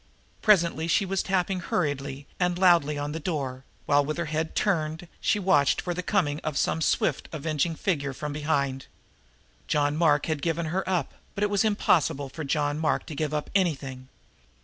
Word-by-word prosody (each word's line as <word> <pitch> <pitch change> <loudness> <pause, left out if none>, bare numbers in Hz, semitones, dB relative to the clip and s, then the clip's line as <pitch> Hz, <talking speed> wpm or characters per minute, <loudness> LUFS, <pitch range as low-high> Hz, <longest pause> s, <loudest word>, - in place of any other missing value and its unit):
Presently 170 -6 +3
she 180 +4 +2
was 195 0 0
tapping 190 -1 0
hurriedly 140 -5 -2
and 180 -1 +1
loudly 170 -5 +4
on 145 +1 -3
a 160 - -3
door, 140 -6 -3 0.2
while, 145 0 +4
with 155 +3 -3
her 170 - -1
head 160 +1 -2
turned, 160 -3 0
she - - +2
watched 150 -9 +3
for 175 - -2
the 180 - -3
coming 170 -7 0
of 155 -3 -3
some 160 - +1
swift - - +1
avenging 155 +1 -1
figure 145 -7 -1
from 150 +2 -5
behind. 140 -3 -1 0.8
John 145 -1 +1
Mark 150 -3 +3
had 155 -3 -2
given 165 +1 -1
her 190 +1 0
up, 175 -7 0 0.2
but 200 - -1
it 205 - +1
was 205 +1 +3
impossible 165 -9 +2
for 160 +4 -6
John 145 +1 0
Mark 160 - 0
to 155 - -7
give 150 0 -1
up 150 -1 -3
anything. 140 -9 -1
155 Hz, 180 wpm, -27 LUFS, 145-180 Hz, 0.8 s, loudly